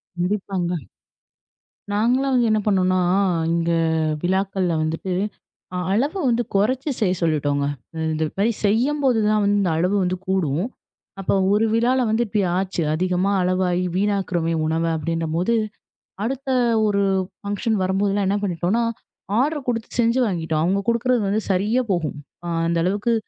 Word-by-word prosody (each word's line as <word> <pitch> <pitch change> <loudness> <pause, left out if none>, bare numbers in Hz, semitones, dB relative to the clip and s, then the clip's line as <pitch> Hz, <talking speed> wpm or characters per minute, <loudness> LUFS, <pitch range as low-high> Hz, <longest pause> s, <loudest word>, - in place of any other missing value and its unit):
கண்டிப்பாங்க. 180 -1 -1 1.2
நாங்கள்லாம் 250 +6 +2
வந்து 240 -2 +3
என்ன 215 - +3
பண்ணோம்னா, 185 -3 +2 0.5
இங்க 170 0 +1 0.5
விழாக்கள் 190 +1 0 0.2
வந்துட்டு 165 +4 -2 0.6
அ - - -1
அளவு 275 - +1
வந்து 240 0 +1
குறைச்சு 255 +8 +1
செய்யச் 185 -5 +1
சொல்லிட்டோங்க. 145 -3 +1 0.5
இந்த 155 0 -1 0.2
மாரி 220 +4 +3
செய்யும்போதுதான் 225 -2 +2
வந்து 200 -2 +2
அளவு 180 +5 +1
வந்து 185 0 -1
கூடும். 180 -3 0 0.5
அப்போ, 195 - 0 0.2
ஒரு 215 +2 +3
விழாவுல 250 +3 +2
வந்து 220 +2 +2
இப்படியாச்சு. 190 -3 0
அதிகமா 180 +3 +1
அளவாய் 180 0 +1
வீணாக்குறமே 185 -4 0
உணவு 165 +1 0
அப்படின்னம்போது, 165 +6 -1 0.7
அடுத்த 270 +4 -3 0.4
ஒரு 200 -1 +1 0.4
ஃபங்ஷன் 205 +2 -1
வரும்போதுலாம் 195 +1 +1
என்ன 200 +2 +1
பண்ணிட்டோம்னா, 185 +4 0 0.6
ஆர்டர் 290 +1 0
குடுத்து 230 -2 -2
செஞ்சு 235 +2 +3
வாங்கிட்டோம். 160 -6 -1
அவங்க 195 +3 +1
குடுக்கிறது 235 +1 +2
வந்து 210 +3 +1
சரியா 210 +7 +2
போகும். 160 -5 -1 0.3
அ - - -4 0.2
அந்த 170 0 0
அளவுக்கு 205 +6 +1
195 Hz, 125 wpm, -22 LUFS, 180-225 Hz, 1.2 s, வந்து